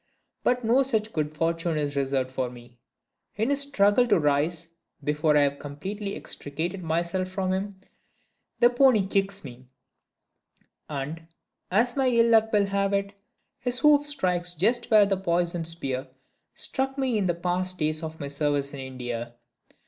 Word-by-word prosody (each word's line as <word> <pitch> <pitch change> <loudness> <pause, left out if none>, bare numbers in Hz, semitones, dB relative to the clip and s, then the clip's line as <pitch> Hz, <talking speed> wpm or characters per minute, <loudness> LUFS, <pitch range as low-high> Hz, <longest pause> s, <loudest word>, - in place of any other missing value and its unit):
But 245 -1 +1
no 240 +4 +4
such 220 -5 0
good 150 -1 -1
fortune 165 0 0
is 145 -1 -2
reserved 135 -2 -1
for 130 -1 -2
me. 120 0 -15 0.6
In 220 +6 0
his 285 0 +2
struggles 245 -3 +3
to 205 -4 +4
rise, 150 +3 +1 0.4
before 150 +1 +2
I 145 - +5
have 140 0 -1
completely 195 +8 -5
extricated 165 +6 -5
myself 170 +3 -1
from 185 0 -1
him, 195 0 -4 0.8
the 240 0 +6
pony 245 -5 +4
kicks 195 +1 -1
me; 130 -2 -11 1.2
and, 150 +3 -5 0.4
as 235 +6 +2
my 270 -2 +2
ill 235 -2 +4
luck 220 0 +4
will 205 -2 +3
have 200 0 0
it, 200 0 -1 0.5
his 245 +1 -1
hoof 295 0 +4
strikes 180 -11 +1
just 235 +8 +1
where 215 -3 +6
the 195 -1 0
poisoned 175 -2 -1
spear 135 -5 -2 0.5
struck 270 0 -1
me 255 -5 0
in 195 - 0
the 175 - 0
past 185 +1 -1
days 155 0 -1
of 160 0 -7
my 145 - -4
service 140 0 -1
in 140 - -7
India. 120 -3 -6
180 Hz, 160 wpm, -26 LUFS, 150-215 Hz, 1.2 s, the